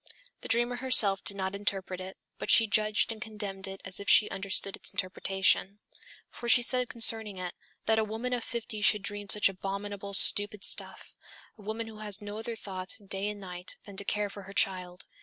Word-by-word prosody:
The - - -7
dreamer 240 +2 +1
herself 220 -6 +5
did 200 - +1
not 190 0 -2
interpret 195 -2 -3
it, 190 +1 -8 0.2
but - - -5
she 225 - +7
judged 215 +1 +1
and 220 -1 -8
condemned 205 -3 -5
it 195 0 -8
as 185 0 -1
if 200 - -4
she 215 - +7
understood 195 0 -1
its - - 0
interpretation. 190 +1 0 0.5
For 240 - -5
she 240 0 +7
said 250 0 +3
concerning 225 -3 +2
it: 180 -1 -4 0.3
"That 220 0 +3
a - - +2
woman 225 +4 -4
of 245 -2 -2
fifty 225 -2 -5
should 205 0 +5
dream 205 0 -4
such 210 0 +4
abominable, 200 +1 -4
stupid 205 0 +2
stuff - - -1 0.4
a 215 - -16
woman 220 +2 -4
who 220 -1 -11
has 210 -1 -2
no 205 0 -7
other 230 +1 -5
thought, 190 -3 -3
day 200 +1 -1
and 210 -1 -6
night, 180 -2 -6
than 200 - -11
to 200 - 0
care 205 0 -1
for 200 - -9
her - - -9
child!" 180 -3 0
205 Hz, 200 wpm, -29 LUFS, 195-220 Hz, 0.5 s, she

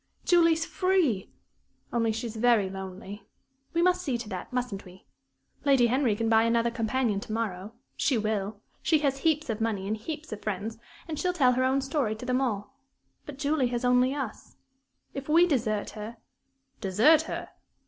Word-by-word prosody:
"Julie's 330 -2 +4
free! 355 - +1 0.6
Only 230 -2 +2
she's 225 0 -4
very 220 -4 +3
lonely. 195 +1 -8 0.4
We 335 0 +1
must 365 0 +3
see 270 -9 -1
to 230 -2 -7
that, 185 -3 -6
mustn't 245 -6 -3
we? 185 0 -15 0.6
Lady 270 -4 +5
Henry 245 -2 +2
can 225 +2 -1
buy 225 0 +5
another 230 +1 +2
companion 230 -2 0
to 210 - -8
morrow 215 -2 -3 0.2
she 265 - +1
will. 210 -1 -2 0.2
She 320 - +3
has 275 -1 +1
heaps 310 0 +1
of 225 -2 -3
money 210 -4 -1
and 215 - 0
heaps 305 +7 -7
of 215 - -6
friends, 215 +2 -4 0.3
and 310 -2 -4
she'll 360 +3 0
tell 270 -8 +4
her 255 +1 +1
own 265 +1 +2
story 270 -5 -1
to 220 - -8
them 250 +1 +1
all. 220 -2 -2 0.5
But 290 -2 -8
Julie 285 -2 +1
has 240 0 -2
only 250 +1 +4
us. 270 -7 -6 0.6
If 275 +1 -6
we 335 +3 +6
desert 225 -10 0
her 215 +2 -8 0.3
" 270 0 -44
"Desert 225 +12 +5
her!" - - -5
240 Hz, 180 wpm, -28 LUFS, 215-275 Hz, 0.6 s, we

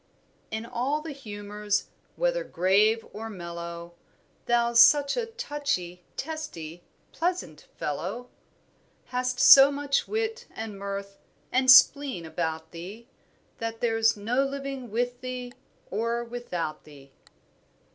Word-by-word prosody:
"In 220 +1 -4
all 265 +6 -1
the 315 0 -6
humours, 210 -5 -3 0.3
whether - - 0
grave 210 - +2
or 225 +1 -6
mellow, 170 -2 -7 0.5
Thou's 235 0 +3
such 285 +3 +6
a 475 -2 -2
touchy, 290 - -3
testy, 265 - -6 0.3
pleasant 335 - -3
fellow, 190 +12 -4 0.7
Hast 250 0 -2
so 275 +1 +9
much 280 0 0
wit 450 +2 -3
and 220 -3 -6
mirth, 200 0 -6 0.3
and 260 +1 +2
spleen 260 - +6
about 160 0 -4
thee 200 +9 -9 0.5
That 230 0 -4
there's 225 -2 +2
no 235 +6 +1
living 275 -2 -5
with 245 +3 -2
thee 250 -1 -6 0.4
or 230 +3 -1
without 230 -10 -5
thee." 140 -2 -16
235 Hz, 115 wpm, -27 LUFS, 195-275 Hz, 0.7 s, so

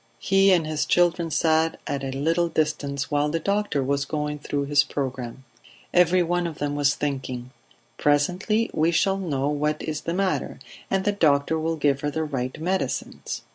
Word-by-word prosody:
He 195 +7 +4
and 170 -4 +3
his 155 -1 -1
children 175 -1 +2
sat 160 +1 +2
at 140 -1 -3
a 135 - -2
little 165 +6 +1
distance 140 -4 -1
while 145 0 +2
the 165 +2 -1
doctor 200 -7 0
was 140 +1 0
going 150 0 -3
through 145 -1 -2
his 145 0 +4
programme. 130 -2 -5 0.5
Every 180 0 +4
one 175 +1 0
of 160 - -7
them 145 0 -2
was 145 -1 +2
thinking: 130 -3 -4 0.5
"Presently 180 +10 +1
we 160 +2 +2
shall 190 +3 +2
know 145 -7 -1
what 150 +1 0
is 155 -1 -3
the 170 - -3
matter, 195 0 -1 0.3
and 190 0 0
the 205 - +3
doctor 160 -4 +2
will 165 +1 -1
give 140 -3 +1
her 145 - -1
the 160 +2 -2
right 130 -4 -3
medicines." 185 +4 -3
155 Hz, 175 wpm, -24 LUFS, 140-175 Hz, 0.5 s, He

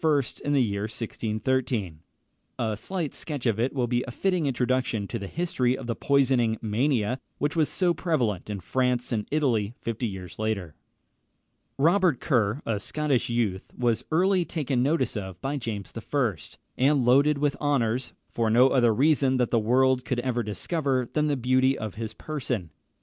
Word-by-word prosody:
in 145 - 0
the 135 -3 +4
year 100 -2 -2
1613. 110 - -2 0.6
A 110 -2 -1
slight 175 - -4
sketch 145 -6 -4
of 115 -3 +1
it 125 +3 +1
will 130 -3 0
be 120 +1 0
a - - -4
fitting 180 +4 0
introduction 125 -4 0
to - - -4
the 100 - -6
history 130 - 0
of - - -7
the 115 -1 -2
poisoning 130 -5 +2
mania, 120 +2 0 0.2
which 145 +1 -1
was 160 -3 +2
so 180 -2 +2
prevalent 125 - -1
in 105 -2 -3
France 125 +5 0
and 110 -3 -1
Italy 120 -8 0
fifty 115 +1 -3
years 95 -3 -8
later. 105 -7 -2 1.0
Robert 170 0 +3
Kerr, 120 -1 +1
a 110 -3 -1
Scottish 145 +3 -1
youth, 110 -6 -1
was 120 -3 +1
early 185 +3 +3
taken 145 -6 -1
notice 135 -2 +1
of 95 -3 -5
by 140 +2 -2
James 110 -6 -5
I., 115 -1 0 0.4
and 135 -1 +3
loaded 140 +4 +4
with 145 0 +1
honours, 130 -4 0 0.2
for 115 -1 0
no 125 +4 +6
other 120 -4 +3
reason 135 0 +3
that 125 -2 +1
the 115 - +3
world 130 +3 +3
could 125 - -2
ever 120 -1 -1
discover 130 - -1
than 150 0 +1
the 145 -2 +1
beauty 130 +2 +2
of 110 -3 -5
his 110 0 -6
person. 125 - -4
125 Hz, 170 wpm, -26 LUFS, 110-140 Hz, 1.0 s, no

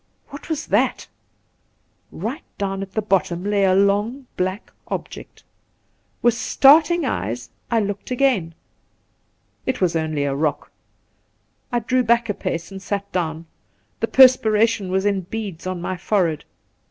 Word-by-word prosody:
what 285 +3 -10
was 310 -1 -2
that? - - +1 1.0
Eight 230 - -5 0.2
down 195 -1 -2
at 195 0 -7
the 220 - -1
bottom 180 -3 0
lay 205 -1 +2
a 185 -1 +3
long 205 +7 +1
black 185 +3 -3 0.2
object. - - -7 0.8
With 240 - +5
starting 295 +7 +4
eyes 120 - -3 0.2
I 230 -2 +2
looked 205 -1 -4
again. 245 - +1 1.1
It 260 - -1
was 180 -3 +1
only 155 -2 -1
a 140 -1 -1
rock. 150 +1 -2 1.0
I 240 - +1
drew 255 +2 +1
back 235 -1 +2
a - - +1
pace 170 -1 -4
and 195 0 -8
sat 200 0 -4
down. 165 -2 -2 0.5
The - - 0
perspiration 225 -5 +4
was 190 +1 0
in 200 -2 +1
beads 195 -2 -6
on 185 -1 -3
my 185 - -3
fore 190 -1 +1
head. 155 -2 -7
200 Hz, 145 wpm, -21 LUFS, 180-235 Hz, 1.1 s, With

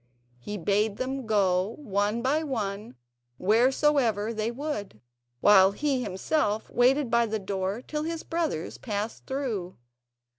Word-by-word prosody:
He 205 +12 -5
bade 205 +3 +1
them 260 -1 -3
go 195 -1 +2
one 210 -3 -1
by 290 +5 +2
one 215 - -4 0.4
wheresoever 230 0 +2
they 215 0 -1
would, 235 - -5 0.4
while 195 -1 +6
he 275 +2 0
himself 210 +2 -1
waited 255 +1 +3
by 235 0 +3
the 220 0 -1
door 195 +2 -3
till 300 +2 -3
his 325 +1 -4
brothers 325 - -3
passed 210 -1 -4
through. 230 -10 -3
220 Hz, 125 wpm, -27 LUFS, 200-265 Hz, 0.4 s, while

